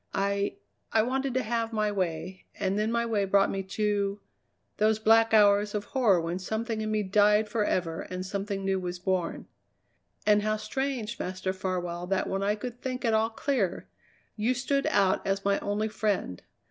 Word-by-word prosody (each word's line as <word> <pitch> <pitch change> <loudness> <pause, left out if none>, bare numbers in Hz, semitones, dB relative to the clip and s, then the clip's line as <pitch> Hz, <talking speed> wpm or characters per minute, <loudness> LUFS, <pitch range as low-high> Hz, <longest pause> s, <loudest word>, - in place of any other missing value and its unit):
I 200 0 0 0.4
I 220 - +4
wanted 265 +1 -1
to 260 - +1
have 230 0 -1
my 215 -2 0
way, 185 -1 -3
and 195 -1 0
then 215 +2 0
my 235 0 +1
way 220 -3 +1
brought 195 0 +3
me 195 - -2
to 200 0 -1 0.6
those 215 0 +3
black 225 +1 +4
hours 205 -1 +4
of 205 - -1
horror 205 -5 +3
when 170 +2 -3
something 220 +3 -3
in 215 - -2
me 215 -1 0
died 210 +2 +4
forever 185 -6 -1
and 185 0 -5
something 195 0 -3
new 195 0 +1
was 180 -1 -4
born. 180 -1 -2 0.8
And 210 -1 +5
how 215 +1 0
strange, 260 -2 -3
Master 185 +1 -3
Farwell, 180 -2 -3
that 195 0 0
when 195 0 -2
I 205 +1 +1
could 245 +3 -7
think 255 -1 -3
at 225 - +2
all 220 +1 +3
clear 225 -5 -1 0.5
you 230 +4 +1
stood 275 +2 0
out 195 -2 +3
as 195 0 -1
my 200 0 +2
only 205 +2 -1
friend. 205 - -2
205 Hz, 180 wpm, -28 LUFS, 190-220 Hz, 0.8 s, And